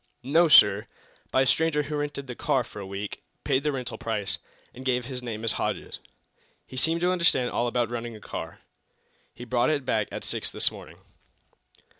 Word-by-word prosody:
"No, 160 +7 +4
sir! 105 -9 +7 0.4
By 130 - +3
a - - 0
stranger 150 +2 +2
who 150 +1 -4
rented 145 -1 -3
the 125 - -6
car 135 0 +1
for 110 - -10
a 100 - -6
week, 100 +1 -5 0.2
paid 130 - +1
the 150 - +1
rental 125 -4 -4
price, 105 -4 -2 0.3
and 130 - -10
gave 125 -2 0
his 130 -1 -4
name 115 -3 -5
as 115 - +3
Hodges. - - -3 0.7
He - - -12
seemed 165 +6 +1
to 180 +1 +3
understand 170 -8 +2
all 120 - 0
about 120 -1 0
running 120 -1 -4
a - - -10
car. - - -7 0.7
He 120 - -8
brought 120 +1 +2
it 145 -4 0
back 110 -4 +1
at - - -5
six - - -2
this - - +1
morning." - - -11
125 Hz, 195 wpm, -27 LUFS, 115-145 Hz, 0.7 s, sir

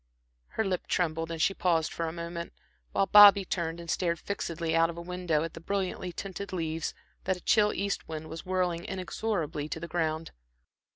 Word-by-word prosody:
Her 220 - +2
lip 185 -2 -2
trembled 165 -2 0
and 165 -1 -4
she 195 - +3
paused 165 -4 +1
for 165 - -2
a - - -2
moment, 170 0 -6 0.4
while 195 - +2
Bobby 200 -1 +9
turned 170 -2 -2
and 170 - -9
stared 170 +1 0
fixedly 165 -4 -2
out 165 0 +4
of 170 - -6
the 170 - -6
window 175 -3 0
at 165 - -5
the - - -8
brilliantly 185 0 -2
tinted 195 +2 -6
leaves 165 -3 -2 0.3
that 190 0 +1
a - - -14
chill 210 +2 +4
east 200 0 -2
wind 160 0 -5
was 160 +1 -7
whirling 180 -2 0
inexorably 180 -5 -3
to 160 - -4
the 170 - -6
ground. 160 -1 -1
170 Hz, 190 wpm, -29 LUFS, 165-185 Hz, 0.4 s, Bobby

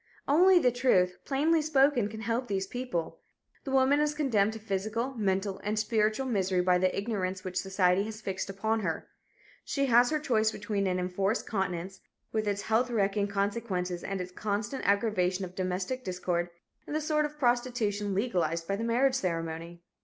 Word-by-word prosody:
Only 360 +6 +6
the 255 -8 +4
truth, 190 -8 +2
plainly 310 +4 +2
spoken, 280 -6 +3
can 220 +1 -8
help 235 +3 -1
these 195 -1 -1
people. 245 -7 -4 0.5
The - - -4
woman 270 +2 +4
is 300 0 +1
condemned 220 -8 +2
to 225 - -7
physical, 220 +5 -2
mental 195 -3 -1
and 210 +1 -1
spiritual 215 +3 +1
misery 190 -6 +1
by 180 0 +3
the 185 0 +1
ignorance 190 -3 -2
which 185 -1 -6
society 190 -1 +2
has 215 0 -7
fixed 195 -3 -4
upon 220 +3 -1
her. 165 -6 -3 0.6
She 275 -1 0
has 245 -1 +5
her 310 - +1
choice 225 -7 +1
between 205 -2 -2
an 180 -1 0
enforced 190 +4 -1
continence, 190 -2 -3 0.3
with 215 -1 -1
its 205 0 -1
health 225 +3 +1
wrecking 205 -3 +1
consequences 200 -3 -2
and 195 -1 -3
its 180 0 -5
constant 210 +5 -3
aggravation 195 -2 +1
of 180 - -10
domestic 185 +7 -2
discord, 180 -3 -2 0.4
and 295 - -4
the - - +2
sort 305 0 +1
of 295 0 -7
prostitution 240 -6 0
legalized 170 -6 0
by 195 - -1
the 225 - -3
marriage 250 +4 +2
ceremony. 170 -5 -3
205 Hz, 175 wpm, -29 LUFS, 185-245 Hz, 0.6 s, Only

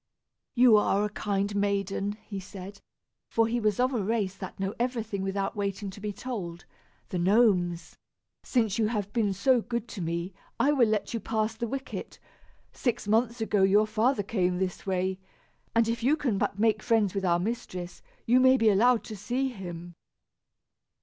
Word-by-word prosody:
"You 245 -3 +7
are 205 0 +2
a 210 - -4
kind 200 -1 -1
maiden," 200 0 0
he 200 -2 -5
said, 195 +1 -10 0.5
for 230 - +3
he 235 +2 0
was 215 -2 0
of 255 +2 +2
a 235 - 0
race 200 -2 0
that 190 -1 -8
know 195 +1 -2
everything 230 -5 -2
without 195 +1 -2
waiting 200 -1 -3
to 200 - -12
be 210 0 -3
told 195 -6 -6 0.4
the 180 - -2
Gnomes. 180 -4 +2 0.4
"Since 230 -4 0
you 220 - +3
have 205 -3 -3
been 220 -4 +1
so 240 +6 +3
good 235 0 -4
to 195 - -6
me, 170 +2 -3 0.3
I 285 - +4
will 260 -6 +4
let 215 +1 -1
you 230 - -1
pass 220 0 -1
the 235 +1 -3
wicket. 270 +3 -6 0.6
Six 240 -5 -2
months 230 +2 +1
ago 210 -2 +1
your 200 +3 +5
father 220 +2 +1
came 185 -3 0
this 185 +1 -3
way, 185 0 -1 0.6
and 230 -1 +4
if 230 +1 -1
you 275 +6 +3
can 250 -10 -1
but 200 - -1
make 215 0 +2
friends 220 -5 +2
with 195 -1 -2
our 175 -2 +3
mistress, 180 -3 -4 0.2
you 245 +2 +5
may 260 +1 +6
be 225 -3 +4
allowed 230 +4 +4
to 215 - -7
see 250 +7 -1
him." 175 -6 -8
210 Hz, 180 wpm, -28 LUFS, 195-230 Hz, 0.6 s, You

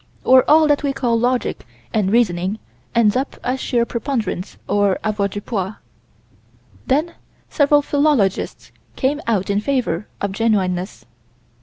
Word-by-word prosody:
Or 260 0 +6
all 315 +1 +6
that 290 -1 +2
we 280 -2 -1
call 245 -4 0
logic 245 +1 -1 0.3
and 200 -3 +1
reasoning 195 -3 +1 0.4
ends 220 -3 +4
up 265 +2 -2
as 255 +2 -1
sheer 235 -2 0
preponderance 230 -7 -3
of 205 -2 +2
avoirdupois. 205 -1 -2 1.1
Then 310 +6 +1 0.4
several 290 -1 +3
philologists 285 -10 0 0.2
came 290 +3 0
out 205 -4 0
in 200 - +1
favor 225 -8 -1
of 200 - -2
genuineness. 190 - -1
230 Hz, 125 wpm, -20 LUFS, 200-270 Hz, 1.1 s, Or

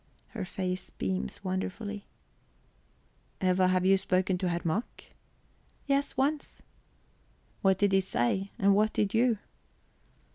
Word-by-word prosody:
Her 210 -5 -5
face 185 0 -3
beams 190 +1 -3
wonderfully. 200 +2 -4 1.3
"Eva, 185 0 +3
have 185 0 +2
you 195 +1 +6
spoken 185 -1 +1
to 185 -1 0
Herr 170 0 -1
Mack?" 175 +8 -3 0.7
"Yes, 280 0 0
once." 285 +2 -1 1.0
"What 190 -1 +4
did 205 0 +2
he 195 0 +4
say, 190 +4 0
and 200 -3 +4
what 215 +2 +3
did 200 -2 0
you?" 230 0 +3
195 Hz, 120 wpm, -30 LUFS, 185-210 Hz, 1.3 s, you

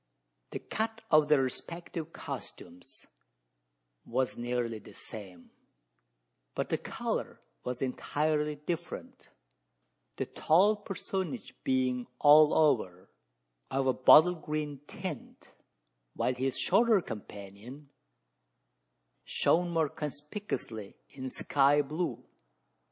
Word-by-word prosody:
The - - -4
cut 225 +1 -3
of 155 -1 +6
their 150 -3 +5
respective 165 +4 -5
costumes 90 - -8 1.0
was 130 +1 -1
nearly 120 -2 -2
the - - -14
same; 95 -6 -10 1.0
but - - -2
the - - +1
colour - - -3 0.2
was 125 +1 -3
entirely 150 +3 0
different 170 +3 -6 0.9
the - - -2
tall 195 +7 +4
personage 190 -3 -4
being 130 -1 +1
all 150 +2 +7
over 110 - +2 0.6
of 135 0 0
a 130 - +3
bottle 155 +8 +7
green 150 -3 -4
tint, 180 -8 -7 0.6
while 125 - +1
his 130 +1 -1
shorter 230 -3 +4
companion 110 - -9 1.3
shone 175 +1 +2
more 165 -2 +2
conspicuously 150 - -5
in 130 -1 -6
sky 145 +2 +3
blue. 155 +5 -3
145 Hz, 95 wpm, -31 LUFS, 125-165 Hz, 1.3 s, all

